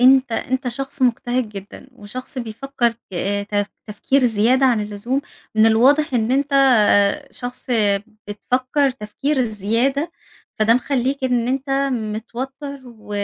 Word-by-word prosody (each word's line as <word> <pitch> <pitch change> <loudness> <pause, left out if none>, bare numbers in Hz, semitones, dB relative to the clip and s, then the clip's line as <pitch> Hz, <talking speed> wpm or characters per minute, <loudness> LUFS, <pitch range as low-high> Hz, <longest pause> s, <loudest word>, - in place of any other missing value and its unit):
أنت 260 -1 +5
أنت 260 +2 -1
شخص 270 +2 -5
مجتهد 245 -1 +1
جدًا 200 +5 -10
وشخص 255 +4 -8
بيفكر 240 +1 -1 0.2
ك - - -9 0.4
تف 205 -1 +1 0.2
تفكير 255 +6 +1
زيادة 245 +4 +3
عن 235 -4 +3
اللزوم، 210 +6 -2 0.3
من 220 +1 +5
الواضح 265 +6 +4
إن 230 0 +1
أنت 280 +2 +1 0.8
شخص 245 0 -8 0.6
بتفكر 255 +6 0
تفكير 255 +5 -3
الزيادة، 245 - 0 0.5
فده 220 +2 +4
مخليك 265 +1 0
إن 245 -2 +1
أنت 270 +1 -2 0.2
متوتر 250 +5 -5
و 220 -3 -15
250 Hz, 120 wpm, -20 LUFS, 220-270 Hz, 0.8 s, أنت